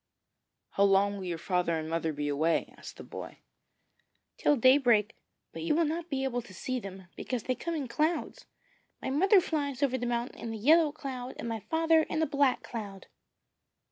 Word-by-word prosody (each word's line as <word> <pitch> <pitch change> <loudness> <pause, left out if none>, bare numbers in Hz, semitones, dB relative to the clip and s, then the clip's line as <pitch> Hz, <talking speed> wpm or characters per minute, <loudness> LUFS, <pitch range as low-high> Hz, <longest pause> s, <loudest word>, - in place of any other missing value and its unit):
'How 200 - +2
long 200 +1 +3
will 190 - -6
your 175 -2 -3
father 175 -1 0
and 155 0 -4
mother 165 0 -1
be 145 0 -3
away?' 155 +3 0
asked - - -11
the - - -9
boy. - - -8 1.0
'Till 295 - +4
daybreak; 245 -4 +4 0.4
but - - -6
you 325 -2 +1
will 335 +1 +3
not 330 +3 -3
be 270 -2 -1
able 245 -2 -1
to 205 -5 -14
see 255 +7 -3
them, 195 -3 -9
because 250 -4 -4
they 255 - 0
come 335 +6 -4
in 285 -4 -3
clouds. 310 +7 -1 0.5
My - - -4
mother 385 +8 +5
flies 290 -6 -2
over 260 -2 +1
the 245 - -2
mountain 240 +1 -2
in 225 - -5
a - - -5
yellow 305 +7 +5
cloud, 265 -4 -6
and - - -5
my 225 -1 -3
father 325 +7 +3
in 315 - -2
a 320 - +3
black 280 -2 +1
cloud.' 205 -4 -7
250 Hz, 195 wpm, -30 LUFS, 200-295 Hz, 1.0 s, mother